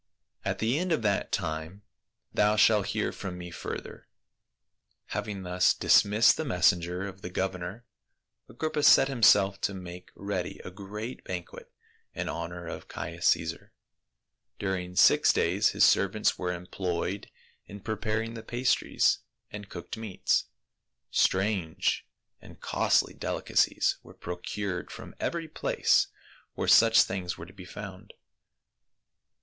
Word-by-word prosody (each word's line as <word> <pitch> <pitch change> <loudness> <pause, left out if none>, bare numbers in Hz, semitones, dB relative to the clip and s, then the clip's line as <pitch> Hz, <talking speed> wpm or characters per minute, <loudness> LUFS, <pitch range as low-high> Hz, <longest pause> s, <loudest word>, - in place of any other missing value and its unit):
At - - -1
the 120 +7 +1
end 180 0 -2
of 140 -8 +1
that 100 -2 0
time 80 +2 -3 0.5
thou 105 +1 +3
shalt 105 -2 +4
hear - - -1
from 90 -2 -6
me 90 0 -8
further." - - -7 1.0
Having 105 -2 -4
thus 90 +1 +2
dismissed 105 +2 +5
the 160 - -1
messenger 90 - +1
of 95 0 -10
the 90 - -6
gov 95 +1 -1
ernor, 90 +5 -7 0.7
Agrippa 155 -1 -2
set 145 -2 +7
himself 105 -6 +4
to 100 - -1
make 90 -1 -9
ready 100 -3 -4
a 90 - -6
great 105 +5 -7
ban 90 -1 -4
quet - - -13 0.5
in - - -3
honor 85 +1 -5
of - - -7
Caius 85 +1 -3
Caesar. 85 -1 0 0.8
During 90 -2 -3
six - - +6
days - - +2
his - - +2
servants 100 +2 +3
were 90 -1 -2
employed 90 +1 -3 0.4
in 100 - -9
preparing 110 +2 -2
the 115 - -7
pastries 125 +3 +1 0.3
and 100 -1 -8
cooked 85 +5 -7
meats. 110 -4 0 0.7
Strange 95 -4 +1 0.3
and - - -14
costly - - +1
delicacies - - +1
were - - -15
procured 90 +2 -5
from - - -10
every 170 -1 -2
place 155 - +2 0.5
where - - -2
such 115 0 +7
things 90 -2 -4
were 80 - -8
to 90 - -15
be 95 -2 -11
found. 100 0 -9
95 Hz, 135 wpm, -28 LUFS, 90-110 Hz, 1.0 s, set